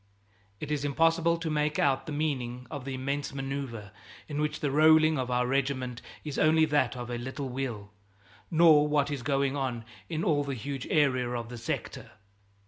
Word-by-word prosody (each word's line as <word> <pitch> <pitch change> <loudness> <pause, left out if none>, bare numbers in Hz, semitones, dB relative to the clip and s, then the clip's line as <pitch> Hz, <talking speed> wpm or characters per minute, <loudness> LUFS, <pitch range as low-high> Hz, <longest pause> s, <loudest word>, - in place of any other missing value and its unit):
It 150 - -5
is 145 -2 -1
impossible 165 +3 +2
to 165 -1 -3
make 150 0 0
out 135 -2 +1
the - - -4
meaning 130 -5 -2
of 145 -4 -6
the 135 -1 -4
immense 140 +2 -3
maneuver 135 -6 -5 0.4
in 150 -1 -3
which 150 0 -1
the 145 - -1
rolling 155 +1 +5
of 125 -1 -2
our 125 0 +1
regiment 130 -2 -1 0.2
is 150 -3 -4
only 160 +1 +5
that 150 -3 +1
of 120 0 -6
a 120 - -3
little 130 +2 -5
wheel, 120 -6 -4 0.6
nor 160 -3 +6
what 145 -1 +1
is 140 -3 -3
going 140 +2 0
on 125 -5 -3 0.2
in 160 +1 -2
all 145 -3 +2
the 140 -1 -3
huge 135 +3 -5
area 130 -5 +2
of 120 -2 -4
the 120 - -7
sector. 115 - -5
140 Hz, 185 wpm, -29 LUFS, 125-150 Hz, 0.6 s, nor